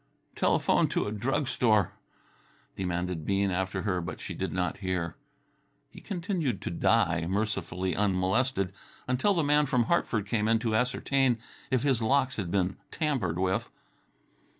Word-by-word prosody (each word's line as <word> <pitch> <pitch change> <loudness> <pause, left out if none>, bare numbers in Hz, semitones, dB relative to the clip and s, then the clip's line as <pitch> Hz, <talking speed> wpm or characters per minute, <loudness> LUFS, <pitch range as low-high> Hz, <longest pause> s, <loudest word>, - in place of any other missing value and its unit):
"Telephone - - +2
to - - 0
a 105 - -3
drug 130 +6 -1
store," 110 -7 +3 0.8
demanded 90 -2 -2
Bean 100 +2 +1
after 95 +1 -1
her, 90 -4 0
but 85 - -6
she - - -6
did - - -3
not 90 +1 -1
hear. 90 -4 -2 0.8
He - - -12
continued 170 - -2
to - - -3
die, 85 -3 +2
mercifully 95 -3 -1
unmolested, 100 +1 +1 0.3
until 130 +11 +2
the 165 - +2
man 150 0 +3
from 125 -2 +2
Hartford 115 - +1
came 105 0 0
in 115 0 +4
to 115 -1 -1
ascertain 125 +2 +2 0.3
if 130 -2 +1
his 135 -5 +2
locks 130 +3 +2
had 95 -5 -2
been 95 0 0
tampered 130 - -1
with. 95 +1 0
105 Hz, 150 wpm, -29 LUFS, 95-130 Hz, 0.8 s, in